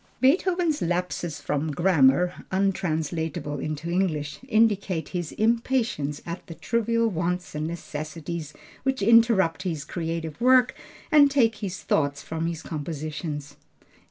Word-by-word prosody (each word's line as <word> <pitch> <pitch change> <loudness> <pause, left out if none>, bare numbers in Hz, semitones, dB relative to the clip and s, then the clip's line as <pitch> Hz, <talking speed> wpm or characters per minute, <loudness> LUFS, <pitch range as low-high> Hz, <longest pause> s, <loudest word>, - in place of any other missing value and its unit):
Beethoven's 340 +3 +2
lapses 175 -2 -2
from 150 +2 -2
grammar 175 +1 +3
(untranslatable 160 -6 -1
into 155 +3 -4
English), 155 -5 -1
indicate 205 - +2
his 175 -3 -3
impatience 225 - 0
at 170 +1 -6
the 165 - -8
trivial 230 +2 +1
wants 180 -2 -2
and 150 +1 -2
necessities 160 -1 -5 0.3
which 265 -5 -1
interrupt 230 -6 +4
his 160 -6 -3
creative 165 -1 -4
work 255 0 +5 0.4
and 295 -2 +7
take 235 -6 +3
his 190 -4 -5
thoughts 145 -1 0
from 160 +1 -3
his 165 -2 -4
compositions. 150 -2 -5
175 Hz, 120 wpm, -25 LUFS, 155-225 Hz, 0.4 s, and